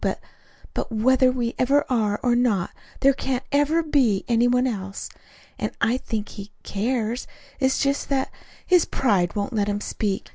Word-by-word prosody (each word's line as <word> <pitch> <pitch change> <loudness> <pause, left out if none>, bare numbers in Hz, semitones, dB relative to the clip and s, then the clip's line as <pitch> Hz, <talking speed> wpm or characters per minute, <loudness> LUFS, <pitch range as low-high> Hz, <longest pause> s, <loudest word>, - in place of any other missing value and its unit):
But - - 0 0.5
but - - -3
whether 255 +3 +4
we 240 -2 -2
ever 280 +3 +3
are, 215 -5 0
or 245 -1 +3
not, 225 -8 +1 0.3
there 275 0 +5
can't 265 -1 -2
ever 290 +4 +2
be 265 -10 +2
any 235 0 +3
one 250 +1 +3
else. 195 -5 -4 0.5
And - - -2
I 240 +3 +2
think 220 -4 -4
he 200 0 -9
cares. 230 +2 -2 0.3
It's 265 -1 +2
just 280 0 0
that 270 -1 0
that - - -24 0.3
his 360 -2 +4
pride 195 -9 +1
won't 205 +1 -2
let 205 -2 +1
him 205 0 -1
speak. 205 -1 -3
245 Hz, 175 wpm, -24 LUFS, 210-265 Hz, 0.5 s, there